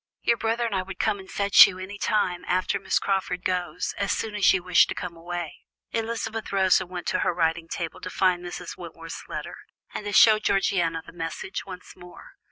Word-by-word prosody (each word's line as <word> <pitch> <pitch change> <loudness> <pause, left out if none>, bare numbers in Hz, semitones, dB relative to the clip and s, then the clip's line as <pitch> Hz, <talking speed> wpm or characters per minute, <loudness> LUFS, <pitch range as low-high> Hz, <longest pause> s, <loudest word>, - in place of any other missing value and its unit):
Your 235 - +3
brother 225 +2 0
and 225 - -2
I 190 - +1
would 190 +1 -8
come 210 -2 0
and 190 - -12
fetch 200 0 +7
you 185 - -6
any 195 +2 -8
time, 185 -5 0
after 185 +2 0
Miss 195 - 0
Crawford 190 -2 -1
goes, 180 -1 -2
as 200 0 0
soon 220 -2 -2
as 205 -2 +4
you 185 -2 0
wish 180 -1 +5
to - - -4
come 175 -2 -6
away." 175 -1 -6 0.3
Elizabeth 225 -1 -3
rose 190 -1 +4
and 180 - -7
went 180 -1 -6
to 185 - 0
her - - +1
writing 165 -1 0
table, 165 -1 -5
to - - -5
find 180 -1 +1
Mrs. 175 - -7
Wentworth's - - -9
letter, - - -6 0.4
and 210 - -5
to 205 - -3
show 215 +1 +7
Georgiana 175 -5 +1
the - - -13
message 165 +3 -5
once 185 -1 -10
more. 180 -1 -14
185 Hz, 210 wpm, -25 LUFS, 175-205 Hz, 0.4 s, fetch